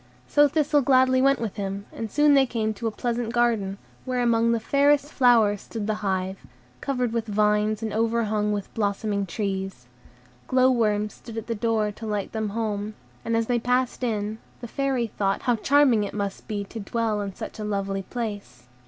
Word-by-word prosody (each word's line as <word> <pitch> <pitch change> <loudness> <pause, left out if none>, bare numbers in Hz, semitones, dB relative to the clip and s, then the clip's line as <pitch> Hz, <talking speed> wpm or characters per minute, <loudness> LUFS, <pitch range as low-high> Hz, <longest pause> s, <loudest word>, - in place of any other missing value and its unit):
So 290 0 +5
Thistle 295 0 +2
gladly 260 -1 +4
went 275 0 +4
with 225 -2 -4
him, 200 0 -4
and 225 - -5
soon 295 +4 +4
they 270 -1 +5
came 220 -2 -1
to 220 +2 -4
a - - +2
pleasant 235 0 -2
garden, 230 -5 +1 0.3
where 250 -1 -1
among 230 -1 +3
the 230 - +1
fairest 285 +4 +2
flowers 225 -6 +4
stood 220 -3 -5
the 215 - 0
hive, 190 -1 -1 0.4
covered 250 -4 -1
with 230 -1 -1
vines 210 +1 +1
and 220 -2 -3
overhung 220 -2 +1
with 205 -2 -4
blossoming 200 -1 -1
trees. 190 - -3 0.6
Glow 255 0 +4
worms 210 -3 +1
stood 230 -2 -10
at 225 - -4
the 235 - -2
door 220 -1 0
to 220 +2 -8
light 210 -2 -2
them 220 -1 -2
home, 210 -1 -3 0.3
and 230 0 0
as 230 - +1
they 240 +1 +1
passed 250 +2 0
in, 215 -2 -2 0.2
the 240 - -7
Fairy 270 -1 0
thought 195 -3 -1
how 245 - +2
charming 265 -3 +4
it 205 - -5
must 200 -2 -4
be 205 -2 -2
to 225 +3 -8
dwell 220 0 -1
in 200 -2 -5
such - - -7
a - - -3
lovely 195 -2 -2
place. 205 - -6
220 Hz, 190 wpm, -25 LUFS, 205-245 Hz, 0.6 s, So